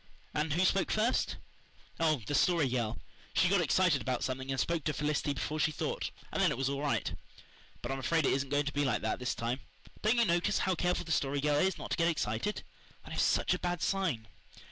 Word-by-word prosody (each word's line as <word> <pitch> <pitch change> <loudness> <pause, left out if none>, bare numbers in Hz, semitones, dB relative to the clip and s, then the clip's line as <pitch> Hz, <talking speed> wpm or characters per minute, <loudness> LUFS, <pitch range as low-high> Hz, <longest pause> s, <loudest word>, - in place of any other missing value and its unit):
"And 150 0 0
who 180 +4 +3
spoke 195 +1 +2
first?" 220 +4 +1 0.6
"Oh, 155 -7 +2
the - - -3
Story 165 0 +3
Girl. 120 -3 -1 0.4
She 180 - +4
got 195 -1 +4
excited 170 -2 +3
about 130 -2 -1
something 130 +1 -3
and 135 -1 -1
spoke 170 -3 0
to 155 - +1
Felicity 150 -1 -1
before 155 +3 -3
she 155 - +2
thought, - - -2 0.2
and - - -1
then - - +5
it - - -2
was 135 0 0
all 140 0 -2
right. 145 -1 0 0.7
But 120 - -3
I'm 135 - -2
afraid 160 +4 +1
it - - +3
isn't 135 0 -1
going 145 +1 +1
to 150 - -3
be 145 - +1
like 130 -5 0
that 110 - -1
this 125 - -2
time. 120 +3 -2 0.4
Don't 220 +3 +3
you 235 - +5
notice 175 +2 +2
how 190 - +1
careful 180 +1 0
the 160 - -5
Story 140 -2 +1
Girl 145 +1 +2
is 190 +1 +2
not - - -7
to - - 0
get 165 - +3
excited? 150 - -1 0.4
That - - -8
is - - +1
such - - +3
a - - -2
bad 175 -1 -2
sign." 165 - 0
150 Hz, 230 wpm, -32 LUFS, 135-175 Hz, 0.7 s, then